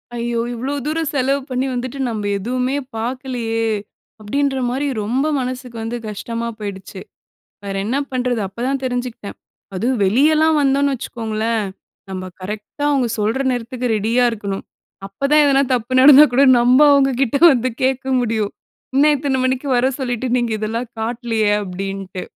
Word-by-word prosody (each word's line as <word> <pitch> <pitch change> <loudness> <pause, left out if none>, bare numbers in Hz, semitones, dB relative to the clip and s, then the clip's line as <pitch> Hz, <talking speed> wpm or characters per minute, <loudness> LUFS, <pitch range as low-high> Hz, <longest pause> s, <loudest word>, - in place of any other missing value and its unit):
ஐயோ! 235 0 -2
இவ்ளோ 255 +4 -3
தூரம் 315 0 -1
செலவு 275 +1 +1
பண்ணி 255 +1 -1
வந்துட்டு, 255 +2 -4
நம்ம 210 -3 -3
எதுவுமே 250 +5 -1 0.2
பாக்கலயே! 235 -2 -2 0.5
அப்பிடின்றமாரி 270 +3 -1 0.2
ரொம்ப 250 +7 0
மனசுக்கு 250 -1 -5
வந்து 235 +2 -3
கஷ்டமா 230 +3 -4
போயிடுச்சு. 200 -3 -7 0.7
வேற 195 -1 -4
என்ன 245 +6 -1
பண்றது? 250 -2 -1
அப்ப 195 - -23
தான் 275 0 -1
தெஞ்சுக்கிட்டன். 245 -4 -4 0.4
அதுவும் 240 +5 0
வெளியலாம் 305 +9 +3
வந்தோன்னு 280 0 +2
வச்சுக்கோங்களேன்! 225 -2 -2 0.5
நம்ம 185 0 -5
கரெக்டா 210 +9 -6
அவுங்க 265 -4 +1
சொல்ற 215 +5 0
நேரத்துக்கு 245 +1 -3
ரெடியா 230 +4 +1
இருக்கணும். 200 -3 -5 0.4
அப்ப 195 0 -19
தான் 300 0 +6
எதனா 275 -1 +4
தப்பு 240 +1 -3
நடந்தா 285 +2 +9
கூட 260 +3 +4 0.2
நம்ம 245 +2 +4
அவங்ககிட்ட 270 -2 +2 0.2
வந்து 255 -1 0
கேட்க 265 +1 +1 0.2
முடியும் 220 -3 -1 0.4
என்ன 285 +3 +5
இத்தன 275 -1 -1
மணிக்கு 260 +2 -1
வர 245 +1 +3
சொல்லிட்டு 250 -1 -2
நீங்க 240 -1 0
இதெல்லாம் 225 +3 -3
காட்லயே 225 -2 -1
அப்பிடின்ட்டு. 195 0 -5
245 Hz, 140 wpm, -19 LUFS, 220-265 Hz, 0.7 s, நடந்தா